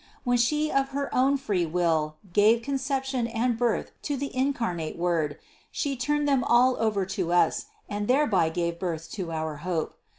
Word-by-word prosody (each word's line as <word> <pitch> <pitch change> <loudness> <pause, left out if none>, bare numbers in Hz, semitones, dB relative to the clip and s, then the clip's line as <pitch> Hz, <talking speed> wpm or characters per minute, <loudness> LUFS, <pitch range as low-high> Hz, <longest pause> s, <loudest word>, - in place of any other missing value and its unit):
When 245 -2 +2
She 300 +6 +2
of 270 0 +1
her 280 -1 -3
own 270 +2 +3
free 200 -10 -1
will 160 -2 0 0.2
gave 220 +4 +4
conception 265 -2 -1
and 235 +1 0
birth 235 -1 0
to 290 -2 -2
the 280 0 -5
incarnate 230 - -1
Word 165 -4 0 0.3
She 280 -2 -2
turned 295 +3 0
them 275 -3 +3
all 250 +2 +4
over 215 -4 +1
to 185 -2 -2
us 175 - +2 0.2
and 205 0 -3
thereby 235 - +3
gave 170 0 -2
birth 165 -3 -4
to 185 -5 -4
our 160 -2 -3
hope. 165 0 -3
225 Hz, 170 wpm, -27 LUFS, 175-265 Hz, 0.3 s, gave